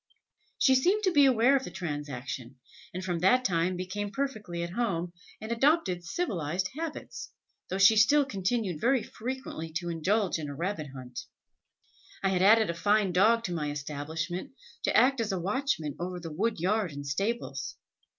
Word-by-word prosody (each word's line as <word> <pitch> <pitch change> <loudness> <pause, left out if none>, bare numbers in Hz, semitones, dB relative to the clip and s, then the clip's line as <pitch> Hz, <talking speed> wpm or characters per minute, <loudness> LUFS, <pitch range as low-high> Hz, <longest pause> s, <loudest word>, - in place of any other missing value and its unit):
She 265 - +5
seemed 370 +12 +3
to 375 - +3
be 290 -4 +6
aware 255 +1 +5
of 270 - +1
the - - -6
transaction, 145 -7 -5 0.4
and 185 +1 -5
from 175 -2 -1
that 250 +9 +4
time 175 0 +1
became 185 +3 -4
perfectly 210 -8 -3
at 170 - -5
home, 180 -6 -1 0.3
and 220 +1 -6
adopted 235 - +2
civilised 180 - -2
habits, 320 0 -6 0.4
though 190 - -2
she 195 +3 +7
still 280 +7 +5
continued 195 - -2
very 255 0 +3
frequently 245 -10 -6
to 175 +1 -3
indulge 185 +3 0
in 150 -2 -5
a 140 - -6
rabbit 170 -1 -3
hunt. 125 -2 -7 1.0
I 195 - +3
had 185 -1 +1
added 215 0 +5
a - - -5
fine 205 +3 +2
dog 220 +6 +4
to 180 - -3
my 150 -3 -2
establishment, 155 - -4 0.3
to - - +3
act 260 -1 +4
as 220 -2 -1
a 190 - -1
watchman 190 - -1
over 180 +1 -4
the 165 -2 -7
wood 215 +4 -1
yard 195 +1 +1
and 145 0 -7
stables. 200 - -2
190 Hz, 170 wpm, -29 LUFS, 165-230 Hz, 1.0 s, she